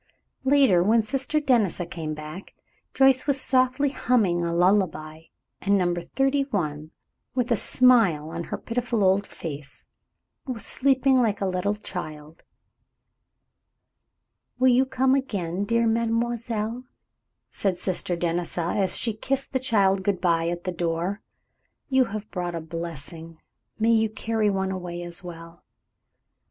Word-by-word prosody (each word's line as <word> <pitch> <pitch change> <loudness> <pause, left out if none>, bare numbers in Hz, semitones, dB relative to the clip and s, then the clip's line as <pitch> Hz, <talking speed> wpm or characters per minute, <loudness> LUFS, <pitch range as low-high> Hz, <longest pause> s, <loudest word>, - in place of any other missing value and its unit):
Later, 265 -10 +5
when 220 +5 +3
Sister 270 +6 -1
Denisa 230 - +1
came 160 -2 -5
back, 155 +5 -9 0.4
Joyce 270 0 +4
was 280 -1 +2
softly 255 +2 +2
humming 215 -10 +1
a 170 - -1
lullaby, 170 -3 +1 0.4
and 200 0 +2
Number 175 -2 0
Thirty 270 +9 0
one, 155 - -3 0.5
with 250 -1 -1
a - - +5
smile 215 -12 +4
on 170 0 -5
her - - -4
pitiful 235 -2 -2
old 195 +1 +2
face, 145 -3 -8 0.6
was 240 -5 -4
sleeping 265 -1 +2
like 215 -4 0
a 195 - -1
little 185 +2 -1
child. 155 -6 -7 2.2
"You 255 -1 +5
will - - -22
come 260 0 +2
again, 200 -9 -2
dear 230 +2 +1
mademoiselle," 230 0 -1 0.7
said 190 -3 -1
Sister 180 -1 -2
Denisa, 170 0 -2
as 195 -2 +3
she 230 - +2
kissed 270 +6 -2
the 260 - +1
child 200 -6 +2
good 190 -1 -1
by 165 -2 +1
at 175 0 -4
the 185 - -2
door. 175 +3 -2 0.7
"You 260 -1 +4
have 215 -1 -7
brought 175 -2 -3
a - - -2
blessing, 165 0 -7 0.4
may 225 +1 +2
you 220 -1 +3
carry 220 0 -1
one 190 -1 -1
away 175 -2 -5
as 175 +1 -7
well!" 170 -1 -11
200 Hz, 140 wpm, -25 LUFS, 170-240 Hz, 2.2 s, Later